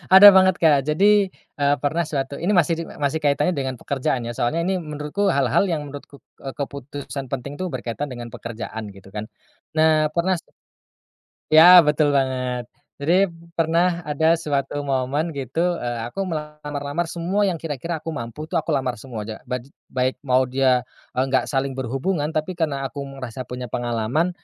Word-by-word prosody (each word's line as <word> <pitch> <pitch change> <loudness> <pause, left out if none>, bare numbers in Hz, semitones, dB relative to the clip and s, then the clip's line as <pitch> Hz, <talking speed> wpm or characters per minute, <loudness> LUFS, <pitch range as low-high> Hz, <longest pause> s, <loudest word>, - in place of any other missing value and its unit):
Ada 200 +2 +12
banget 190 -1 +5
Kak, 150 -4 +4
jadi, 200 +6 +4 0.3
eee, 145 0 +3
pernah 160 +4 +1
suatu 140 -2 -3
ini 175 +5 0
masih 170 -1 +4
di - - -2
masih 145 +2 -2
kaitannya 145 +2 +2
dengan 130 -2 -2
pekerjaan 130 -1 -2
ya, 115 - -4
soalnya 155 +10 0
ini 185 +1 0
menurutku 150 +5 -2
hal-hal 140 - +2
yang 160 -4 -1
menurutku, 140 0 -11 0.2
eee, 135 -1 -6
keputusan 140 0 -6
penting 135 +2 -5
tuh 185 - -2
berkaitan 130 -1 -4
dengan 120 -3 -7
pekerjaan 110 -1 -6
gitu 95 0 -14
kan. 105 +1 -5 0.5
Nah, 155 -1 +4
pernah 180 +2 +2 1.1
ya, 175 +3 +10
betul 150 -2 +2
banget. 130 -3 -1 0.3
Jadi 175 +7 +3 0.3
pernah 170 +1 +1
ada 160 +3 +2
suatu 145 -2 -2
momen 140 +4 -1
gitu, 165 +6 -1
eee, 120 -2 -3
aku 160 +11 -4
melamar-lamar 150 0 -4
semua 180 +4 -1
yang 190 -4 +1
kira-kira 160 +1 -4
aku 160 +1 -6
mampu 115 +6 -6
tuh, 175 - -9
aku 165 - 0
lamar 130 -2 0
semua 110 -3 -7
ja 110 0 -7
ba 125 - 0
j 120 - -15 0.2
baik 130 0 -1
mau 130 -1 +3
dia, 130 -1 +2 0.3
eee, 130 - +3
nggak 130 -1 0
saling 135 -1 -1
berhubungan 135 +5 -1
tapi 155 +3 -2
karena 145 -5 -1
aku 140 +2 -6
merasa 135 -3 -7
punya 125 0 -6
pengalaman, 120 +8 -1
145 Hz, 170 wpm, -22 LUFS, 130-165 Hz, 1.1 s, Ada